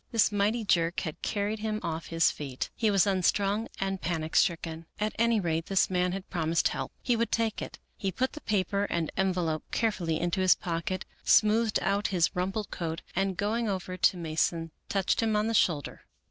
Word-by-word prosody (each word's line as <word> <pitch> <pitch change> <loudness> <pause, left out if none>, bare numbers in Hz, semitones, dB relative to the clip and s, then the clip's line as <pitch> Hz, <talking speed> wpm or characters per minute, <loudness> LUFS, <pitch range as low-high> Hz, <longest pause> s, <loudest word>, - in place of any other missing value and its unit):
This 225 -3 +3
mighty 210 +3 +1
jerk 170 -2 +2
had 155 -3 -5
carried 210 +1 -1
him 215 0 -2
off 160 0 -3
his 165 0 +3
feet. 135 -3 -5
He 220 - +1
was 200 -2 +4
unstrung 200 +2 +1
and 195 -1 -2
panic 160 -2 -2
stricken. 165 -2 +1
At 210 0 -1
any 230 -1 +3
rate 165 -3 -1
this 195 -1 +2
man 180 0 +1
had 195 +1 -5
promised 165 -1 +1
help. - - -4
He 245 - +2
would 230 0 0
take 225 -2 0
it. - - -7 0.2
He 195 - -2
put 260 +8 -1
the 305 - -8
paper 200 -1 0
and 170 -5 -2
envelope 180 -5 0
carefully 185 -8 0
into 175 +2 0
his 185 -1 +6
pocket, 175 +2 -3 0.2
smoothed 220 0 +4
out 200 +1 +1
his 175 -4 +1
rumpled 195 +4 -2
coat, 165 -1 -4
and 190 0 0
going 220 +2 0
over 185 -1 -3
to 185 - +3
Mason 165 0 -1 0.2
touched 195 +2 +1
him 220 -1 +1
on 210 0 +2
the 225 - 0
shoulder. 160 - +1
190 Hz, 190 wpm, -29 LUFS, 170-210 Hz, 0.2 s, his